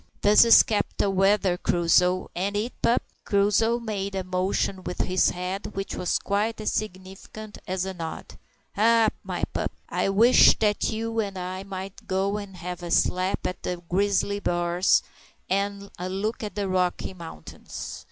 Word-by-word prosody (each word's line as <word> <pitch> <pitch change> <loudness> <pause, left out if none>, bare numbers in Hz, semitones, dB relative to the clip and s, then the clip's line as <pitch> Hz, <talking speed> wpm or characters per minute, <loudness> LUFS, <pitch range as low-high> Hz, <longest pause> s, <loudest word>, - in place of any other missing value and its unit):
"This 210 +2 +7
is 230 - +8
capital 205 -2 -1
weather, 195 -1 +2
Crusoe; 180 +1 +2
ain't 195 +3 -2
it, 225 +4 -2
pup?" 235 - +2 0.2
Crusoe 210 +3 +2
made 200 -4 -4
a 190 - -2
motion 185 +1 -1
with 180 - -3
his 185 0 +2
head 185 +3 -5
which 195 0 -4
was 180 - 0
quite 210 +3 -1
as 215 - -1
significant 200 +2 -6
as 185 0 -1
a 190 - -4
nod. 165 -3 -6 0.5
"Ha! 225 +1 +4
my - - -5
pup, - - -2 0.2
I - - 0
wish 225 +6 +6
that 210 -1 +1
you 225 +1 -2
and 200 -3 -2
I 185 +1 -4
might 195 0 -8
go 195 +2 0
and 200 -3 -8
have 180 +1 -6
a 175 - -6
slap 185 +2 +1
at 180 - -3
the 180 - -3
grizzly 200 +2 +1
bars, 175 0 +2 0.4
and 200 +1 -2
a 180 +1 -3
look 205 +5 -3
at 210 -4 -5
the 205 -1 -1
Rocky 185 0 -1
Mountains. 165 - -9
195 Hz, 160 wpm, -25 LUFS, 185-210 Hz, 0.5 s, is